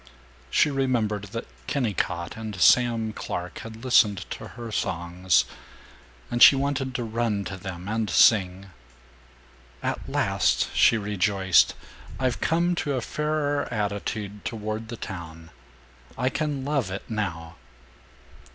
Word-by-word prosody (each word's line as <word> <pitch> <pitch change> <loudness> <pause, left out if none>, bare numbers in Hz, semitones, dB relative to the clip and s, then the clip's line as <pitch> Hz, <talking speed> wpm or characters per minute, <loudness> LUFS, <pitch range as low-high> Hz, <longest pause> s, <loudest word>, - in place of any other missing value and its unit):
She 150 - +3
remembered 120 -7 0
that 115 +3 -6 0.2
Kennicott 100 -10 -1
and 110 -4 -6
Sam 115 0 +4
Clark 90 -4 -5
had 115 +2 -9
listened 105 -7 +4
to - - -6
her 120 -2 -6
songs, 85 - +1 0.9
and 120 - -1
she - - +10
wanted 135 -1 -1
to 120 - -1
run 110 -2 -1
to 95 - -5
them 95 -1 -7
and 110 0 -1
sing. 95 +2 +4 1.1
"At - - -3
last," - - +1
she 115 - +5
rejoiced, 100 -3 +2 0.4
"I've 130 -2 -1
come 170 +2 +2
to 145 -3 -1
a 130 - -1
fairer 150 +1 -1
attitude 105 -1 -3
toward 110 -1 -4
the 115 0 -7
town. 85 -4 -8 0.7
I 130 - +1
can 145 -2 -2
love 140 -8 0
it, 95 +1 -6
now." 85 - -4
110 Hz, 125 wpm, -25 LUFS, 95-125 Hz, 1.1 s, she